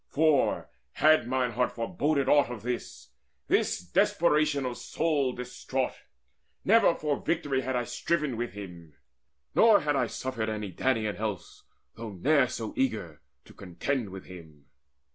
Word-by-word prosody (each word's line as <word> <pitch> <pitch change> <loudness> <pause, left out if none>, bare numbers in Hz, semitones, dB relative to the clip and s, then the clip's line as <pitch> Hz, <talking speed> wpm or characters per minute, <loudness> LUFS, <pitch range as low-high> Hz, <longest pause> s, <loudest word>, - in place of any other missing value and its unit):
For, 155 -2 +2 0.3
had 155 -5 +4
mine 125 -1 0
heart 125 +2 0
foreboded 140 +2 0
aught 145 -2 +4
of 115 -4 -7
this, 125 0 -5 0.4
This - - +2
desperation 150 - +2
of 125 - -1
a - - -7
soul 150 -4 0
distraught, 125 +1 -3 0.7
Never 220 -4 +5
for 150 -2 -2
victory 145 -5 0
had 130 0 -2
I 125 - +1
striven 140 +3 -1
with 120 -3 -4
him, 85 -6 -10 0.6
Nor 220 -2 +6
had 145 -1 0
I 135 - +1
suffered 120 -4 -3
any 105 -3 -4
Danaan 110 -1 0
else, 105 -5 -5 0.3
Though 115 -2 -7
ne'er 140 - +3
so 130 - -5
eager, 160 - -2 0.2
to - - -16
contend 105 +6 -3
with 95 0 -9
him. 80 -6 -13
125 Hz, 145 wpm, -28 LUFS, 105-150 Hz, 0.7 s, Nor